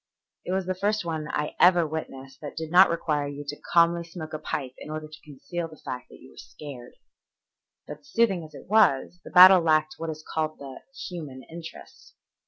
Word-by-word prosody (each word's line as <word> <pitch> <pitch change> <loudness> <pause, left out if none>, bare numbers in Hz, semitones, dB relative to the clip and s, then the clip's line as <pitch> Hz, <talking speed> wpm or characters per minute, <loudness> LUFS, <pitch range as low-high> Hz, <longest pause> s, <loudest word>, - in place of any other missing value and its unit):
It - - -4
was 190 0 0
the 185 - -1
first 205 +1 -1
one 160 -2 -3
I 150 - -3
ever 175 -2 +6
witnessed 135 -4 -7
that 150 -1 -8
did 160 -1 -5
not 185 +2 +7
require 150 -3 -1
you 145 0 -7
to 145 +1 -6
calmly 170 0 +4
smoke 165 -2 -9
a 155 - -3
pipe 130 -4 -4
in - - -9
order 155 0 -5
to 155 0 -14
conceal 155 +4 -6
the 155 -1 -14
fact 125 -2 -7
that - - -14
you - - -16
were - - -21
scared. 135 -5 -10 0.9
But 150 -1 -10
soothing 195 -5 +1
as 155 - -13
it - - -11
was, 180 -6 +3
the - - -10
battle 185 0 +9
lacked 155 -1 +2
what 165 0 -4
is 155 0 -7
called 155 -1 -2
the 135 -2 -10 0.3
human 150 -7 -8
interest. 165 0 -12
155 Hz, 200 wpm, -26 LUFS, 145-175 Hz, 0.9 s, battle